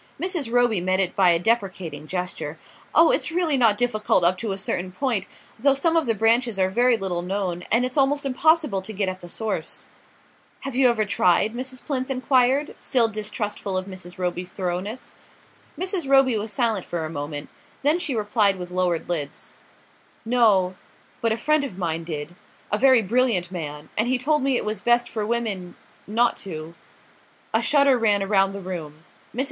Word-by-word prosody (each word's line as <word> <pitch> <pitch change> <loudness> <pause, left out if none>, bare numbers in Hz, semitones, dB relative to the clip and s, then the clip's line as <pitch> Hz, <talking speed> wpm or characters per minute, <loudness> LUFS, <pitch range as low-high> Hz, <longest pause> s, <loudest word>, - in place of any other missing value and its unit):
Mrs. 345 -10 -2
Roby 240 -5 +2
met 185 +1 +1
it 185 -2 +1
by 190 -2 +5
a 170 - +4
deprecating 180 -7 -2
gesture. 180 +2 -4 0.4
"Oh, - - +6
it's - - +1
really 330 -3 +1
not 225 -5 +3
difficult 215 -6 +1
up 175 +2 +4
to 225 -3 -3
a 195 - -3
certain 185 -2 -2
point; 220 -1 -1 0.3
though 275 +3 +3
some 330 +4 +1
of 325 -5 +2
the 225 - +1
branches 225 +1 +2
are 190 0 +1
very 240 +3 +3
little 185 -4 -2
known, 180 -1 -3
and 235 +3 +4
it's 255 +3 -4
almost 280 +1 +2
impossible 295 - +2
to 215 +3 -7
get 200 -1 -1
at 185 0 -6
the 175 - -10
source." 220 +4 -3 0.8
"Have 275 -2 -6
you 260 -1 +5
ever 220 -3 +1
tried?" 200 +1 +2
Mrs. 255 +1 -5
Plinth 260 -2 -1
enquired, 260 +2 +2
still 245 -4 +3
distrustful 210 -2 -3
of 185 - -2
Mrs. 185 -2 -9
Roby's 180 0 -3
thoroughness. 185 +6 -4 0.6
Mrs. 370 -5 -2
Roby 270 -3 +5
was 215 0 -3
silent 220 -3 +1
for 170 -2 -4
a - - -3
moment; 145 -1 -5 0.3
then 300 +5 +3
she 290 -7 -2
replied 210 -2 +2
with 180 -1 -7
lowered 180 -2 0
lids: 150 -5 -4 0.7
"No 215 -6 +3 0.5
but 230 - +1
a 220 - 0
friend 305 +4 +2
of 220 -10 -6
mine 165 -3 -2
did; 155 0 -6 0.4
a 210 - +2
very 260 -3 +5
brilliant 215 -5 +1
man; 150 -4 -6
and 220 - +1
he 255 +1 +2
told 300 +4 +1
me 265 -1 +2
it - - -3
was 215 0 -3
best 240 0 +3
for 215 -2 -3
women 215 -6 -2 0.3
not 235 +3 +2
to...." 160 -3 -7 0.8
A - - +3
shudder 280 -3 +4
ran 205 -3 +2
around 195 -1 +2
the 200 - -6
room. 160 -4 -7 0.3
Mrs. - - -5
215 Hz, 185 wpm, -23 LUFS, 185-255 Hz, 0.8 s, Oh